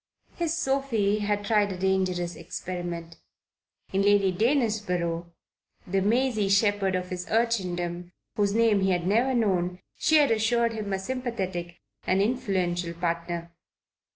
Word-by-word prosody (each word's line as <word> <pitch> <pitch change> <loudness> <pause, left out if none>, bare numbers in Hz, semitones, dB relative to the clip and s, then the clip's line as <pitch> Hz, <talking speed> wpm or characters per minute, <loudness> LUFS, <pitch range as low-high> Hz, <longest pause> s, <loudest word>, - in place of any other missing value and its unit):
His 335 -1 -1
Sophie 265 -9 +1
had 205 0 -1
tried 205 -1 +2
a 185 - -5
dangerous 185 -2 0
experiment. 175 -2 -6 0.8
In 195 - +2
Lady 200 -1 +4
Danesborough, 185 - 0 0.6
the 190 +2 0
Maisie 220 -1 +1
Shepherd 200 -1 +2
of 180 0 -3
his 180 -1 -5
urchindom, 180 -6 -1 0.2
whose 205 -2 +1
name 225 -3 +4
he 190 - +2
had 175 -2 0
never 235 +7 +2
known, 180 -6 +1 0.2
she 315 - +3
had 290 -5 +4
assured 230 +1 +2
him 215 -2 -4
a 195 - +1
sympathetic 190 -6 -4 0.3
and 185 - +3
influential 190 -7 0
partner. 170 0 -3
195 Hz, 130 wpm, -27 LUFS, 180-225 Hz, 0.8 s, Lady